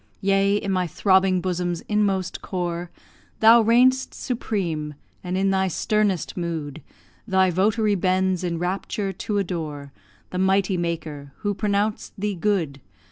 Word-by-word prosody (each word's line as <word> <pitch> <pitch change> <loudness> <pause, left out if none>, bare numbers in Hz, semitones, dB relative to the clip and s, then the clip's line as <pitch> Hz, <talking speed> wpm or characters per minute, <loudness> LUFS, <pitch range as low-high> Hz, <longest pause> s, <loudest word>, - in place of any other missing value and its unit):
Yea, 195 +1 +3
in 200 -1 -1
my 185 -1 +1
throbbing 190 +2 +3
bosom's 175 -1 -2
inmost 200 -3 -1
core, 175 -2 -3 0.5
Thou 225 +1 +7
reign'st 250 +4 +3
supreme; 170 - -3 0.3
and, 180 0 -2
in 195 0 +2
thy 190 0 +2
sternest 205 0 0
mood, 160 -4 -4 0.5
Thy 190 -1 +3
votary 210 +4 +2
bends 185 -1 +1
in 170 -2 -1
rapture 190 +3 -2
to 205 +3 -3
adore 155 -7 -4 0.4
The 180 - -3
Mighty 190 0 +2
Maker, 155 -5 -4
who 205 -1 0
pronounced 205 +1 -1
thee 205 +1 -1
good. 170 -7 -1
190 Hz, 135 wpm, -23 LUFS, 175-205 Hz, 0.5 s, Thou